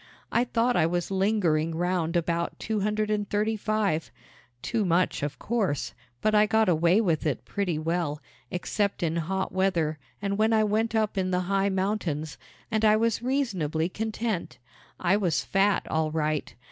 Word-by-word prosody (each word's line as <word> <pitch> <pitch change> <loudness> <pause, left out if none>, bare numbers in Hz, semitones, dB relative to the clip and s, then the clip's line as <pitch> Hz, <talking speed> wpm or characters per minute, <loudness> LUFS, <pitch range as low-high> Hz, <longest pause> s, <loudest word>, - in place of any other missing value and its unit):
I 240 - +2
thought 245 0 +1
I 160 - +4
was 175 +2 -2
lingering 185 -5 +1
round 175 -1 0
about 170 0 0
two 220 -1 -2
hundred 210 +1 0
and 210 -1 -1
thirty 215 +2 +1
five 210 -6 0 0.5
too 230 -3 0
much, 180 0 +1
of 145 0 -3
course; 210 - -1 0.3
but 215 - +3
I 210 0 +5
got 220 0 +3
away 170 +3 +4
with 170 -7 +1
it 145 - -2
pretty 185 -6 -1
well, 160 -2 -1 0.3
except 200 +2 -1
in 165 0 0
hot 190 +4 -2
weather 170 -5 0 0.2
and 200 +5 -2
when 220 +1 +3
I 220 -1 +4
went 220 +2 0
up 215 -2 +1
in 185 -1 0
the 180 0 +1
high 195 +2 +1
mountains, 185 -6 -2 0.3
and 220 0 0
I 215 -1 +6
was 230 0 +1
reasonably 190 - 0
content. 220 -1 -3 0.4
I 185 +3 +3
was 180 -6 0
fat, 195 0 +2
all 160 0 0
right. 155 -5 -2
190 Hz, 170 wpm, -27 LUFS, 165-215 Hz, 0.5 s, I